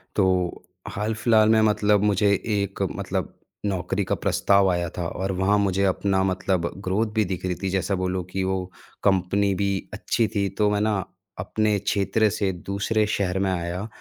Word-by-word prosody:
तो, 95 Hz, -3 st, +1 dB, 0.3 s
हाल-फ़िल्हाल 110 Hz, +1 st, +2 dB
में 110 Hz, 0 st, +5 dB
मतलब 105 Hz, -1 st, +3 dB
मुझे 105 Hz, 0 st, +3 dB
एक 100 Hz, -1 st, -2 dB
मतलब -, -, -3 dB, 0.3 s
नौकरी 95 Hz, 0 st, -1 dB
का -, -, -1 dB
प्रस्ताव 100 Hz, -1 st, +2 dB
आया 85 Hz, -1 st, -1 dB
था 85 Hz, -1 st, -2 dB
और 95 Hz, +3 st, -3 dB
वहाँ 100 Hz, +2 st, +3 dB
मुझे 100 Hz, -1 st, +1 dB
अपना 95 Hz, 0 st, +1 dB
मतलब 95 Hz, -2 st, 0 dB
ग्रोथ 105 Hz, +4 st, 0 dB
भी 110 Hz, -2 st, +3 dB
दिख 90 Hz, 0 st, -4 dB
रही 90 Hz, -1 st, -1 dB
थी। 95 Hz, -, 0 dB
जैसा 95 Hz, +1 st, 0 dB
बोलो 95 Hz, 0 st, -2 dB
कि 95 Hz, -, -1 dB
वो 95 Hz, 0 st, -1 dB, 0.4 s
कंपनी 100 Hz, +1 st, +2 dB
भी 100 Hz, +1 st, 0 dB, 0.2 s
अच्छी 110 Hz, +1 st, 0 dB
थी। 100 Hz, -1 st, +1 dB
तो 105 Hz, -1 st, +3 dB
मैं 105 Hz, 0 st, +1 dB
ना 105 Hz, -3 st, +1 dB, 0.4 s
अपने 105 Hz, +2 st, 0 dB
क्षेत्र 100 Hz, +2 st, +1 dB
से 100 Hz, -1 st, -1 dB
दूसरे 100 Hz, +4 st, -1 dB
शहर 95 Hz, -3 st, -1 dB
में 95 Hz, 0 st, +1 dB
आया 90 Hz, +3 st, -3 dB
100 Hz, 170 wpm, -24 LUFS, 95-105 Hz, 0.4 s, में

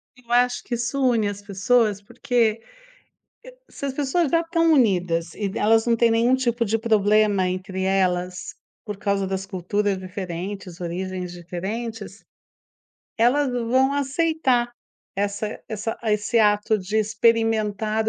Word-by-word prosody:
Eu 245 Hz, -2 st, -16 dB
acho 245 Hz, 0 st, +2 dB
que -, -, -6 dB
isso 240 Hz, +4 st, -2 dB
une 220 Hz, -3 st, +1 dB
as 205 Hz, 0 st, -5 dB
pessoas, 205 Hz, +1 st, +1 dB
porque 230 Hz, 0 st, 0 dB, 0.9 s
e -, -, -12 dB, 0.2 s
se -, -, -6 dB
as 275 Hz, -, -2 dB
pessoas 290 Hz, +3 st, 0 dB
já 335 Hz, -, +3 dB
estão 330 Hz, -1 st, +2 dB
unidas 180 Hz, -, +1 dB
e 205 Hz, -2 st, -2 dB
elas 225 Hz, +1 st, +3 dB
não 235 Hz, -1 st, +3 dB
têm 230 Hz, 0 st, +3 dB
nenhum 235 Hz, +3 st, +3 dB
tipo 240 Hz, -2 st, 0 dB
de 220 Hz, +1 st, +1 dB
problema 210 Hz, -3 st, +2 dB
entre 185 Hz, +1 st, -4 dB
elas, 180 Hz, -2 st, 0 dB, 0.3 s
por 210 Hz, -2 st, -5 dB
causa 200 Hz, -1 st, 0 dB
das 190 Hz, 0 st, -3 dB
culturas 195 Hz, +2 st, -1 dB
diferentes, 185 Hz, -1 st, -6 dB
origens 180 Hz, +1 st, -4 dB
diferentes, 200 Hz, +5 st, -6 dB, 0.9 s
elas 260 Hz, +4 st, +3 dB
vão 250 Hz, +3 st, +2 dB
aceitar 280 Hz, -3 st, +1 dB, 0.5 s
essa 205 Hz, +2 st, -2 dB
essa 220 Hz, +1 st, -4 dB
esse 215 Hz, +2 st, +1 dB
ato 210 Hz, +1 st, +3 dB
de 195 Hz, +3 st, -3 dB
experimentar 220 Hz, -1 st, +1 dB
215 Hz, 135 wpm, -23 LUFS, 195-240 Hz, 0.9 s, já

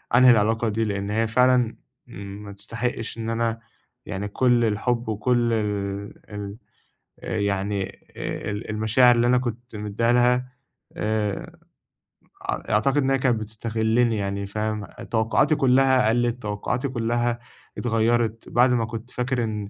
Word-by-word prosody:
أنهي 125 Hz, 0 st, +8 dB
العلاقة 110 Hz, +1 st, +2 dB
دي 110 Hz, +2 st, 0 dB
لأن 100 Hz, -2 st, -2 dB
هي 115 Hz, +1 st, +1 dB
فعلًا 125 Hz, 0 st, +3 dB, 0.3 s
ما 100 Hz, +1 st, -8 dB
تستحقش 115 Hz, +3 st, -4 dB
إن 115 Hz, 0 st, -3 dB
أنا 115 Hz, 0 st, -1 dB, 0.5 s
يعني 100 Hz, 0 st, -4 dB
كل 120 Hz, +2 st, +2 dB
الحب 115 Hz, +2 st, 0 dB
وكل 120 Hz, +2 st, +1 dB
ال 100 Hz, -2 st, -2 dB, 0.2 s
ال 100 Hz, 0 st, -6 dB, 0.6 s
آآ، -, -, -3 dB
يعني 100 Hz, 0 st, 0 dB, 0.3 s
آآ، -, -, -4 dB
ال 105 Hz, +1 st, -5 dB
المشاعر 110 Hz, +3 st, +4 dB
اللي 120 Hz, +1 st, +3 dB
أنا 125 Hz, +1 st, +4 dB
كُنت 120 Hz, -1 st, -5 dB
مدّيها 105 Hz, +3 st, 0 dB
لها، 125 Hz, +1 st, +2 dB, 0.4 s
آآ، 105 Hz, -2 st, -2 dB, 0.9 s
أع -, -, -3 dB
أعتقد 110 Hz, +7 st, +2 dB
إن 135 Hz, -2 st, +2 dB
هي 135 Hz, -, +3 dB
كانت 125 Hz, -3 st, +2 dB
بتستغلّني 110 Hz, +1 st, 0 dB
يعني، 100 Hz, 0 st, -2 dB
فاهم، 105 Hz, +1 st, -2 dB
أ -, -, -12 dB
توقعاتي 115 Hz, +7 st, +2 dB
كلّها 130 Hz, -3 st, +4 dB
قَلّت 120 Hz, +1 st, +1 dB
توقعاتي 105 Hz, +6 st, -2 dB
كلّها 120 Hz, -1 st, 0 dB, 0.4 s
اتغيّرِت 115 Hz, -1 st, 0 dB
بَعد 125 Hz, +1 st, +4 dB
ما 115 Hz, -2 st, +1 dB
كُنت 115 Hz, +2 st, -7 dB
فاكر 125 Hz, -1 st, -1 dB
إن، 105 Hz, -2 st, -3 dB
115 Hz, 145 wpm, -24 LUFS, 105-120 Hz, 0.9 s, أنهي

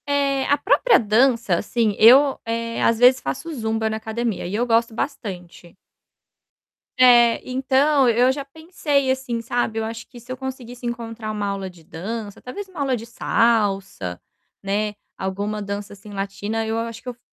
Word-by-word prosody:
É. 280 Hz, -1 st, +1 dB
A 285 Hz, -, +3 dB
própria 470 Hz, -, +4 dB
dança, 230 Hz, -2 st, +2 dB
assim, 215 Hz, +2 st, 0 dB
eu, 265 Hz, +5 st, +7 dB
eh, 230 Hz, 0 st, -3 dB
às 230 Hz, -, +3 dB
vezes, 255 Hz, +1 st, +6 dB
faço 330 Hz, +5 st, -4 dB
zumba 220 Hz, -3 st, -1 dB
na 220 Hz, -, -2 dB
academia 220 Hz, 0 st, -3 dB
e 180 Hz, -, -6 dB
eu 235 Hz, +3 st, +1 dB
gosto 230 Hz, -1 st, +2 dB
bastante. 185 Hz, -, -6 dB, 1.2 s
É. 240 Hz, -2 st, +6 dB
Então, 265 Hz, +2 st, +3 dB
eu 245 Hz, +3 st, +4 dB
já 280 Hz, +1 st, -4 dB
pensei 295 Hz, -2 st, -1 dB
assim, 260 Hz, -3 st, -2 dB
sabe, 230 Hz, -1 st, -1 dB
eu 220 Hz, -, -2 dB
acho 225 Hz, +1 st, -7 dB
que 240 Hz, -, -13 dB
se 245 Hz, +2 st, -12 dB
eu 255 Hz, -, -4 dB
conseguisse 250 Hz, -2 st, -7 dB
encontrar 230 Hz, -2 st, -5 dB
uma 205 Hz, -1 st, -3 dB
aula 195 Hz, -1 st, -3 dB
de 175 Hz, -3 st, -17 dB
dança, 205 Hz, +6 st, -6 dB
talvez 395 Hz, +11 st, -7 dB
uma 370 Hz, -4 st, -11 dB
aula 270 Hz, -2 st, +1 dB
de 230 Hz, -1 st, -7 dB
salsa, 200 Hz, -, 0 dB, 0.4 s
né, 205 Hz, +2 st, -1 dB, 0.2 s
alguma 200 Hz, +3 st, -3 dB
dança, 200 Hz, 0 st, -5 dB
assim, 205 Hz, +1 st, -13 dB
latina, 200 Hz, +3 st, -3 dB
eu 220 Hz, +1 st, -2 dB
a 230 Hz, 0 st, -2 dB
acho 230 Hz, -1 st, -9 dB
que 255 Hz, -, -7 dB
eu -, -, -5 dB
f 240 Hz, -, -30 dB
230 Hz, 175 wpm, -22 LUFS, 210-260 Hz, 1.2 s, eu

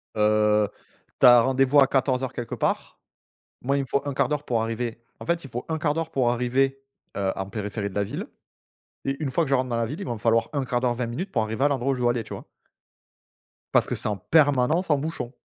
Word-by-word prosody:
Heu, 105 Hz, 0 st, +3 dB, 0.5 s
tu -, -, +5 dB
as 120 Hz, -1 st, +9 dB
rendez-vous 135 Hz, +3 st, +3 dB
à 135 Hz, -, +6 dB
14 130 Hz, -1 st, +1 dB
heures 130 Hz, -1 st, -3 dB
quelque 120 Hz, -, -5 dB
part -, -, -2 dB, 0.6 s
moi 140 Hz, +3 st, 0 dB
il 140 Hz, -, +1 dB
me -, -, -4 dB
faut 140 Hz, +2 st, 0 dB
1/4 140 Hz, -2 st, 0 dB
d'heure 150 Hz, -1 st, -2 dB
pour 120 Hz, -5 st, 0 dB
arriver 115 Hz, +1 st, -3 dB, 0.2 s
en -, -, -8 dB
fait 170 Hz, 0 st, 0 dB
il -, -, -9 dB
faut 120 Hz, +1 st, -5 dB
1/4 155 Hz, -2 st, 0 dB
d'heure 165 Hz, +1 st, -3 dB
pour 130 Hz, -5 st, +2 dB
arriver, 135 Hz, +3 st, 0 dB, 0.4 s
heu, 95 Hz, -1 st, 0 dB
en 95 Hz, -, -3 dB
périphérie 105 Hz, 0 st, -4 dB
de 95 Hz, -, -13 dB
la 100 Hz, -, +1 dB
ville 100 Hz, -, -5 dB, 0.8 s
et 135 Hz, -, 0 dB
une 135 Hz, -, -2 dB
fois 170 Hz, -, +2 dB
que -, -, -6 dB
je 140 Hz, -, +4 dB
rentre 130 Hz, 0 st, -1 dB
dans 120 Hz, -, -1 dB
la 115 Hz, -, +1 dB
ville, 150 Hz, -, -6 dB
il -, -, -4 dB
va 120 Hz, -, -2 dB
me -, -, -6 dB
falloir 115 Hz, +1 st, +2 dB
1/4 130 Hz, -4 st, -1 dB
d'heure 125 Hz, -1 st, +1 dB
20 120 Hz, 0 st, -2 dB
minutes 175 Hz, -, -5 dB
pour 115 Hz, -5 st, +1 dB
arriver 110 Hz, +4 st, -2 dB
à -, -, +6 dB
l'endroit 135 Hz, -1 st, 0 dB
où -, -, -2 dB
je 125 Hz, -, -5 dB
dois 120 Hz, -1 st, +3 dB
aller 120 Hz, -1 st, -2 dB
tu -, -, -9 dB
vois -, -, -9 dB, 1.3 s
parce -, -, +4 dB
que -, -, -2 dB
c'est -, -, -2 dB
en 105 Hz, -2 st, -1 dB
permanence 145 Hz, -, +2 dB
en 145 Hz, -, +4 dB
bouchon 145 Hz, -4 st, -4 dB
125 Hz, 250 wpm, -25 LUFS, 115-140 Hz, 1.3 s, as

